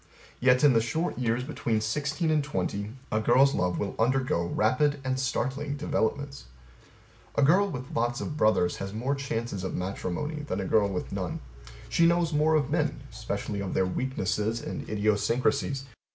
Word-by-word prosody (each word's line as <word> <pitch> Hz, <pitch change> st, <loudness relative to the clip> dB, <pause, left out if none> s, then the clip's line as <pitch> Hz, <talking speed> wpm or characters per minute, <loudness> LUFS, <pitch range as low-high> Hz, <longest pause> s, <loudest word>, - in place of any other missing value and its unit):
Yet 125 Hz, +1 st, +4 dB
In 145 Hz, -3 st, +7 dB
the 115 Hz, -, +4 dB
short 145 Hz, +7 st, -2 dB
years 120 Hz, 0 st, 0 dB
between 115 Hz, -3 st, -1 dB
sixteen 150 Hz, +9 st, -1 dB
and 150 Hz, -2 st, +2 dB
twenty 100 Hz, -4 st, -3 dB, 0.2 s
a 110 Hz, -, +2 dB
girl's 130 Hz, +5 st, +4 dB
love 90 Hz, 0 st, 0 dB
will 100 Hz, -, -3 dB
undergo 125 Hz, -7 st, +1 dB
rapid 130 Hz, +10 st, +2 dB
and 130 Hz, 0 st, -1 dB
startling 135 Hz, +3 st, -1 dB
developments. 140 Hz, -, -2 dB, 0.9 s
A -, -, +3 dB
girl 190 Hz, +8 st, +5 dB
with 130 Hz, -6 st, -6 dB
lots 120 Hz, +2 st, 0 dB
of 150 Hz, -, -4 dB
brothers 110 Hz, -10 st, +2 dB
has 100 Hz, 0 st, -5 dB
more 125 Hz, +5 st, 0 dB
chances 115 Hz, -7 st, -3 dB
of 95 Hz, -, -3 dB
matrimony 95 Hz, -, -3 dB
than 125 Hz, -10 st, -3 dB
a 95 Hz, -, -2 dB
girl 100 Hz, +1 st, +3 dB
with 95 Hz, -, -4 dB
none: -, -, -3 dB, 0.5 s
she 165 Hz, -, +4 dB
knows 170 Hz, -1 st, +2 dB
more 155 Hz, +2 st, +3 dB
of 145 Hz, -4 st, +1 dB
men; -, -, 0 dB
especially 100 Hz, -, -4 dB
of 100 Hz, -2 st, -3 dB
their 95 Hz, -, +3 dB
weaknesses 105 Hz, 0 st, -1 dB
and -, -, -6 dB
idiosyncrasies. 115 Hz, +6 st, +1 dB
125 Hz, 165 wpm, -28 LUFS, 105-145 Hz, 0.9 s, In